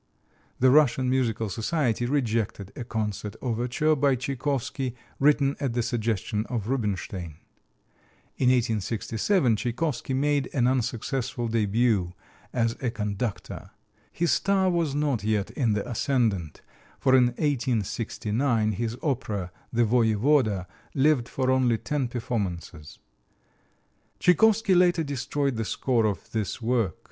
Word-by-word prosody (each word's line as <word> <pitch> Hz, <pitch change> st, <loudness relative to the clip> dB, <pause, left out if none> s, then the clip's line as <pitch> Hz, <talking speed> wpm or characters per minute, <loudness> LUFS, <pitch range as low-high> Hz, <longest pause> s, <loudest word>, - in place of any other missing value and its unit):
The 130 Hz, 0 st, +5 dB
Russian 130 Hz, -3 st, +4 dB
Musical 115 Hz, -4 st, 0 dB
Society 120 Hz, -, -1 dB
rejected 115 Hz, -7 st, -1 dB
a 135 Hz, -, -5 dB
concert 105 Hz, -2 st, -3 dB
overture 125 Hz, +6 st, 0 dB
by 140 Hz, -1 st, +3 dB
Tchaikovsky, 135 Hz, 0 st, -2 dB, 0.2 s
written 140 Hz, -1 st, +3 dB
at 135 Hz, -5 st, -1 dB
the 120 Hz, 0 st, 0 dB
suggestion 110 Hz, -2 st, -1 dB
of 115 Hz, -5 st, -3 dB
Rubinstein. 95 Hz, -, -3 dB, 1.0 s
In 125 Hz, -, +2 dB
1867 115 Hz, -, +1 dB
Tchaikovsky 130 Hz, +3 st, -2 dB
made 145 Hz, 0 st, +1 dB
an 125 Hz, -3 st, +3 dB
unsuccessful 125 Hz, 0 st, -1 dB
début 110 Hz, -4 st, +1 dB, 0.4 s
as 115 Hz, -2 st, 0 dB
a 125 Hz, -, 0 dB
conductor. 105 Hz, -1 st, -4 dB, 0.4 s
His 170 Hz, -3 st, 0 dB
star 190 Hz, +9 st, +2 dB
was 165 Hz, -5 st, 0 dB
not 145 Hz, -7 st, 0 dB
yet 105 Hz, -2 st, 0 dB
in 120 Hz, -6 st, 0 dB
the 105 Hz, -1 st, -2 dB
ascendant, 110 Hz, -, -1 dB, 0.4 s
for 130 Hz, -1 st, +3 dB
in 125 Hz, -1 st, +6 dB
1869 115 Hz, -, 0 dB
his 115 Hz, +3 st, -3 dB
opera, 110 Hz, -, -2 dB, 0.2 s
"The 120 Hz, 0 st, +2 dB
Voyevoda," 110 Hz, -2 st, +2 dB, 0.3 s
lived 135 Hz, -3 st, +2 dB
for 130 Hz, -1 st, 0 dB
only 125 Hz, -3 st, +3 dB
ten 140 Hz, +2 st, -2 dB
performances. 100 Hz, -, -4 dB, 1.2 s
Tchaikovsky 210 Hz, +3 st, +4 dB
later 175 Hz, -2 st, +4 dB
destroyed 140 Hz, -1 st, -2 dB
the 115 Hz, -, -1 dB
score 115 Hz, 0 st, +1 dB
of 100 Hz, -, -4 dB
this 110 Hz, 0 st, -2 dB
work. 115 Hz, -6 st, 0 dB
120 Hz, 120 wpm, -26 LUFS, 110-135 Hz, 1.2 s, in